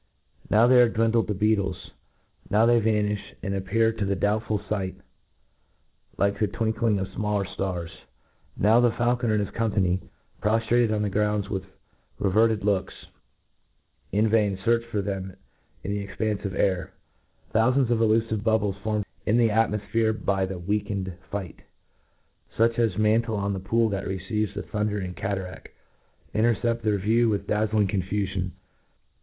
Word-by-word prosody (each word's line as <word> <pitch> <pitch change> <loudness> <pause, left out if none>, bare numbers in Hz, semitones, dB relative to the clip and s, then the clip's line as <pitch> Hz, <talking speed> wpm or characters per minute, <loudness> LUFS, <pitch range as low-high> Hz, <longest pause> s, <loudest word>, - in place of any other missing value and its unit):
* - - -28
tiow 110 +3 +5
they 125 0 +7
are 120 - +5
dwindled 115 0 +1
to 105 - 0
beetles 100 -2 0 0.6
l^^^^now^i 115 +3 +4
tht?y 110 - +1
tanifli, 105 -1 0 0.2
and 100 - -2
appear 100 +4 +1
to 110 - -3
the 100 0 0
doubtful 105 +2 0
fight 100 -2 -3 1.2
like 100 0 +1
thd 105 -3 0
twinkling 110 -1 +1
of 95 -1 -2
the - - -18
fmallcr 105 -2 0
ftars 90 -4 -3 0.4
!— - - -36
now 110 +4 +5
the 120 0 +5
fauJeo* 120 +1 0
net 120 -3 +1
and 105 - +2
his 100 - -4
company, 95 -5 +1 0.4
proftrated 115 +2 +2
on* 105 -1 0
the 105 - 0
groupdi 105 0 0
with 95 -2 -3 0.5
r«;vcrted 110 +2 +2
looks, 100 -2 0 1.2
in 105 +3 +2
vain 105 -3 +2
fearch 115 +4 +1
for 105 -4 -2
them 95 -2 -4 0.5
in 100 - -3
the 100 -1 -3
expanfc 105 0 -2
of 95 - -3
air!— 95 -3 0 0.6
^Thpufands 125 +3 +3
of 115 - +2
elufive 110 -1 +2
bubble* 110 -3 +2
formed 105 +1 -2 0.2
in 110 - +3
the 115 -2 +4
atmofphere 110 0 +1
by 95 -1 +1
the 95 -1 -5
weakened 100 0 -2 0.2
fight* 95 -5 -5 1.0
fiich 115 +1 +3
as 115 -6 +1
mantle 110 +1 +2
on 100 0 -1
the 95 - -3
pool 115 +5 +1
that 100 -1 -3
receives 95 +2 -2
the - - -4
dumdering 105 -3 -2
cataraft, 95 -1 -5 0.7
intercept 115 +1 +1
their 105 -2 +1
view 115 +4 +2
with 105 -2 -1
dtoriing 105 -1 +1
confufion. 95 -1 -2
105 Hz, 160 wpm, -25 LUFS, 100-115 Hz, 1.2 s, they